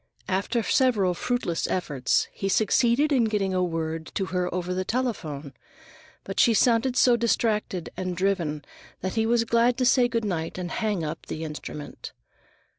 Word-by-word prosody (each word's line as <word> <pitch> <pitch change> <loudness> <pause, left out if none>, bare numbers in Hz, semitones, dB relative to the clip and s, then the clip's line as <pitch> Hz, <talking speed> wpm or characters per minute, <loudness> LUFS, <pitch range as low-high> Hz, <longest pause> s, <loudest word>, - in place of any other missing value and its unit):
After 200 +5 0
several 210 -7 +2
fruitless 245 -4 -1
efforts, 145 -8 0
he 195 - -3
succeeded 235 +8 +3
in 255 -5 +3
getting 205 -3 0
a 185 0 +1
word 160 -2 -3
with 190 - -2
her 180 -1 -1
over 180 0 -2
the 185 +1 -1
telephone, 165 - -3 0.7
but 195 - -5
she 230 - +5
sounded 245 +3 +3
so 245 -2 +5
distracted 215 -6 0
and 185 -1 -4
driven 170 -6 -1 0.4
that 185 0 -3
he 225 0 +1
was 235 0 +3
glad 235 +1 +2
to 255 - +1
say 245 -1 +5
good 230 -2 -2
night 165 -5 -3
and 180 -1 -4
hang 210 -6 -1
up 155 +1 -5
the 160 - -5
instrument. 150 -1 -7
195 Hz, 165 wpm, -26 LUFS, 175-235 Hz, 0.7 s, she